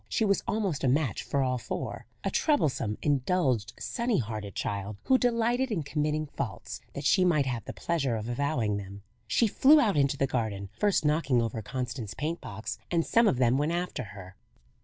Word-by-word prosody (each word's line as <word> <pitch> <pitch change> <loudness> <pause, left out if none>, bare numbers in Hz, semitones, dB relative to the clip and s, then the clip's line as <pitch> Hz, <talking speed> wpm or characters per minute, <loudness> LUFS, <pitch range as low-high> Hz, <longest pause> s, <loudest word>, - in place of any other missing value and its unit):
She 225 - +1
was 200 -1 +2
almost 200 -9 -1
a - - +3
match 130 - +1
for 140 -1 0
all 125 -1 0
four - - -5 0.2
a - - -1
troublesome, 140 - +1
indulged, 135 - +1
sunny 235 -3 -1
hearted 105 - -4
child, 100 0 -3
who 260 -1 +4
delighted 245 +2 +1
in 175 -8 -1
committing 150 +1 -1
faults, 115 -4 -5
that 140 - -6
she 185 - +4
might 160 -6 +3
have 120 -5 -3
the - - -5
pleasure 140 -8 -1
of 110 0 -4
avowing 120 -4 0
them. 100 0 -8 0.2
She 235 - +3
flew 280 +8 +6
out 210 - +2
into 140 0 +2
the 135 - +2
garden, 110 -7 -2
first 205 -6 +2
knocking 150 -4 +2
over 115 -1 -2
Constance's 125 -2 -4
paint 160 +4 -3
box, 105 +3 -6
and 170 -2 +1
some 230 0 +4
of 135 - +2
them 125 +1 +3
went 150 +3 +1
after 175 -8 -2
her. 95 -2 -11
140 Hz, 190 wpm, -29 LUFS, 115-175 Hz, 0.2 s, flew